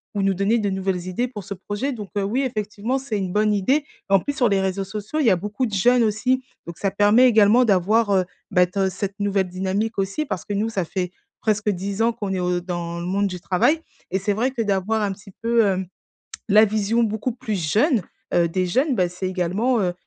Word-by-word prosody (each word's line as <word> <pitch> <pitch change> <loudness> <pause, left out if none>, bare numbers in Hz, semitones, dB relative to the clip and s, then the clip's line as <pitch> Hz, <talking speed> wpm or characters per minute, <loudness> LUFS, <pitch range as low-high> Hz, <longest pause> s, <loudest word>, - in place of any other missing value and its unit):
ou 200 - 0
nous 195 0 +2
donner 200 +5 +1
de 205 - 0
nouvelles 190 -2 -2
idées 210 +7 -1
pour 210 -5 -8
ce 200 - -5
projet. 205 +8 -3
Donc 210 -5 -7
heu, 200 - +1
oui 230 +7 0
effectivement 220 0 -2
c'est 260 -5 -3
une 190 -2 -2
bonne 210 0 +2
idée, 265 +10 +1 0.2
en 195 - +5
plus 285 - -3
sur 245 -6 +2
les 195 -1 +2
réseaux 190 0 -1
sociaux 210 +9 -4
il 300 - +2
y - - +6
a 185 - +3
beaucoup 210 +7 -2
de 220 - -5
jeunes 240 +5 +4
aussi, 250 +5 +1 0.2
donc 170 0 -8
ça 195 - -1
permet 205 +6 +5
également 220 +1 +5
d'avoir, 210 +2 +3
heu, 185 -2 +3 0.3
bah 180 -2 +5
t 190 +2 -1
cette 195 +1 -4
nouvelle 200 -2 +1
dynamique 190 +5 -2
aussi 195 +11 -1
parce 185 - -4
que 205 - -5
nous 205 +2 0
ça 195 -5 -1
fait, 180 0 -3 0.3
presque 210 -1 0
10 200 +2 -2
ans 230 +1 +3
qu'on 205 -4 -4
est 185 - -1
au 180 0 0
dans 175 -1 -4
le 170 - -5
monde 200 +3 +1
du 180 -2 -5
travail, 190 - +2 0.3
et 190 - +1
c'est 200 +2 0
vrai 245 +6 0
que 245 -3 -3
d'avoir 210 +1 0
un 200 -1 0
petit 195 +1 -15
peu, 230 -1 +3
hem, 190 -1 0 0.6
la 215 +2 +7
vision 215 +2 +1
beaucoup 220 +2 -1
plus 215 -5 -4
jeune, 250 +2 +3 0.3
heu, 170 -1 +3
des 185 +2 0
jeunes, 260 - +1
bah, 180 -5 +1
c'est 185 +1 -4
également, 190 +7 0
heu, 180 -1 0
205 Hz, 235 wpm, -22 LUFS, 190-225 Hz, 0.6 s, la